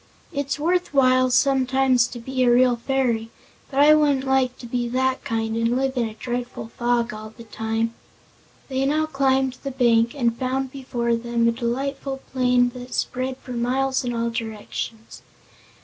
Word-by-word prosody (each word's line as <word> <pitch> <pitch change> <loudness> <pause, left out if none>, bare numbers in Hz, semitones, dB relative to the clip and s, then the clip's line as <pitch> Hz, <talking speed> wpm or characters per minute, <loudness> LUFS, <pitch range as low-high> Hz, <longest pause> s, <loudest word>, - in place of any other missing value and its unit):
It's 280 0 -2
worth 350 0 0
while, 255 -1 +4
sometimes, 260 -1 +3
to 240 - -9
be 255 +2 -3
a 245 - +4
real 245 0 +5
fairy. 235 -2 -1 0.4
But 275 0 +1
I 300 +1 +8
wouldn't 290 -3 +3
like 265 -2 +1
to - - -10
be 240 0 -2
that 260 +1 0
kind, 225 -1 -2
and 230 +1 +1
live 265 +1 0
in 235 -3 0
a 215 - -12
dreadful 245 -1 -5
fog 240 -1 0
all 215 +1 -9
the 230 - -10
time." 225 +1 -2 0.7
They 265 -1 -1
now 310 +2 +2
climbed 270 -3 +1
the 275 - -4
bank 235 -2 +2
and 235 -4 +1
found 260 +1 -2
before 245 -3 -1
them 235 0 0
a - - +4
delightful 270 +3 -3
plain 250 -1 +3
that 250 0 -8
spread 255 +1 -2
for 255 - -9
miles 260 +3 0
in 245 - -2
all 230 0 -1
directions. 225 0 -6
250 Hz, 170 wpm, -23 LUFS, 235-265 Hz, 0.7 s, I